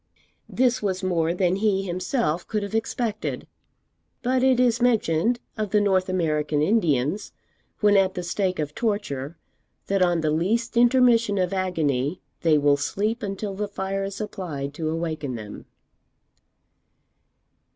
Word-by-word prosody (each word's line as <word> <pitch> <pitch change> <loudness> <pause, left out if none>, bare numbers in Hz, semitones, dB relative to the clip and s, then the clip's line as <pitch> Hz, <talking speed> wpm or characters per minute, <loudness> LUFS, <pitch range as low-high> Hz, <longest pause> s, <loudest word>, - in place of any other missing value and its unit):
This 255 -1 +1
was 190 -2 -2
more 170 -3 +1
than 180 +1 +1
he 200 -2 +1
himself 180 - -1
could 210 -2 -2
have 200 - -6
expected; 225 -1 -2 0.8
but 255 +1 +1
it 260 -1 +4
is 240 -1 +3
mentioned 230 -2 +2 0.2
of 215 -2 -2
the 210 - +3
North 190 -2 +2
American 155 -4 0
Indians, 155 - +1 0.5
when 205 -1 +5
at 190 -1 +3
the 180 - -3
stake 185 +1 -1
of 150 -1 -3
torture, 170 - -2 0.5
that 195 -1 0
on 175 -2 +3
the 155 -1 +1
least 220 +10 0
intermission 235 -3 +4
of 185 0 0
agony 160 -5 0 0.2
they 160 -2 +4
will 145 -1 +3
sleep 210 - -1
until 200 -1 -4
the 205 +2 -3
fire 195 -1 -3
is 195 0 -5
applied 170 -10 -5
to 155 +1 -3
awaken 155 -5 -3
them. 105 -2 -9
190 Hz, 140 wpm, -24 LUFS, 160-215 Hz, 0.8 s, when